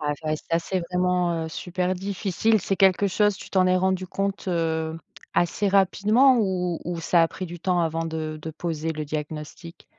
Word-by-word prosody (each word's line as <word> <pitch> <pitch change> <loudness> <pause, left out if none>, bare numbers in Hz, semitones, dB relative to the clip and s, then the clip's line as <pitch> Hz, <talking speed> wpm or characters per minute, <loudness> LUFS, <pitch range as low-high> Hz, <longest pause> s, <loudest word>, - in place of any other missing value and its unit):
Ouais 150 -1 -1
c'est 160 - -10
vrai 155 0 +1
ça 165 - +3
c'est 185 +2 -2
vraiment, 180 -2 +1
heu, 160 - -4
super 180 +2 -2
difficile, 200 +3 0
c'est 195 - -1
quelque 195 +1 +4
chose 205 +1 +2
tu - - -11
t'en 185 -1 +3
es 185 - +3
rendu 185 0 0
compte, 195 +1 -3
heu, 160 -2 -1 0.4
assez 175 +4 +1
rapidement 205 +7 +4
ou 180 -4 0
ou 175 -1 -3
ça 170 +1 +3
a 165 - +3
pris 185 - -6
du 175 -1 -8
temps 180 -1 +1
avant 165 0 -1
de 155 -1 -4
de 160 - -5
poser 160 0 -3
le 155 0 -4
diagnostic? 150 +2 -7
180 Hz, 200 wpm, -25 LUFS, 160-190 Hz, 0.4 s, quelque